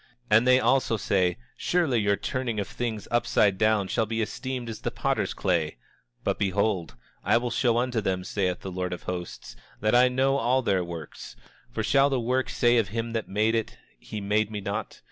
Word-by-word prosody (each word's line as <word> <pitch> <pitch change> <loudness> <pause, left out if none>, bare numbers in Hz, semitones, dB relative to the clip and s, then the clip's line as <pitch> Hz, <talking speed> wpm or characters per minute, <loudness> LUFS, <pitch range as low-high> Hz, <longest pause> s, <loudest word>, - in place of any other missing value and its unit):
And 110 +4 +5
they 130 0 +6
also 130 -4 +2
say: 90 -3 +1 0.2
Surely, 160 -10 +1
your 100 -1 +2
turning 120 -1 -3
of 100 - -2
things 115 -4 -4
upside 105 -4 +2
down 110 -3 +3
shall 110 +2 0
be 115 +1 -2
esteemed 125 +2 -3
as 115 - -6
the - - -1
potter's - - -1
clay. 80 -7 0 0.5
But - - -1
behold, 100 -2 0 0.3
I - - +4
will 120 0 -2
show 120 -1 +2
unto 120 -2 0
them, 95 -2 -1
saith 90 -2 -1
the 95 - -6
Lord 90 0 -3
of 90 - -7
Hosts, 90 -1 -6 0.2
that 110 +1 +1
I 125 +1 +6
know 135 +2 +2
all 130 0 +2
their 95 -5 +1
works. 85 -3 -8 0.3
For 110 - -3
shall 135 +5 +4
the 135 -2 0
work 125 +2 0
say 120 0 +3
of 110 -3 +2
him 115 +3 -3
that 115 -1 -3
made 105 +3 +1
it, 115 -1 -2 0.2
he 105 - -7
made 105 +1 +1
me 105 -1 -4
not? 100 +1 -4
110 Hz, 200 wpm, -26 LUFS, 100-120 Hz, 0.5 s, they